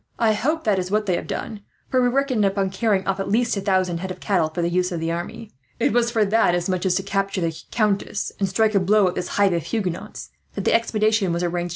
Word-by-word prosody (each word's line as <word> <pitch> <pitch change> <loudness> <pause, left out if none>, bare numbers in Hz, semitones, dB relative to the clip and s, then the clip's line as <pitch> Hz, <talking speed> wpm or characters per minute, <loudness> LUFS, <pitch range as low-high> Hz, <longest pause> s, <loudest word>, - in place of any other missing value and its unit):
"I 225 -2 +3
hope 305 +10 -1
that 205 -3 +2
is 180 0 -3
what 210 +2 +1
they 185 -3 +1
have - - -4
done, 215 -2 -5 0.3
for 255 - +3
we 245 - +3
reckoned 255 -3 +1
upon 195 -1 +1
carrying 195 -1 0
off 195 0 -1
at 195 - -3
least 235 +3 +1
a 200 - -2
thousand 185 -3 +1
head 190 +2 -5
of 185 0 -6
cattle, 180 -6 +1
for 170 +2 -3
the 170 - +1
use 180 +1 +1
of 170 - -3
the 165 +1 -2
army. 210 +6 -6 0.3
It - - +2
was 235 0 +2
for 225 -3 +2
that, 205 -3 +3
as 175 0 -1
much 185 0 -1
as 180 - +2
to 195 - 0
capture 195 -1 -1
the 165 -1 -1
countess 210 -2 -1
and 195 -1 0
strike 220 +3 +2
a 200 - +4
blow 200 +1 +3
at 180 - -1
this 180 - -3
hive 200 -2 +4
of 170 - 0
Huguenots, 185 -1 -4 0.2
that - - -4
the - - +3
expedition 215 -4 +2
was 170 +1 -1
arranged. 175 0 -2
195 Hz, 265 wpm, -22 LUFS, 180-220 Hz, 0.3 s, a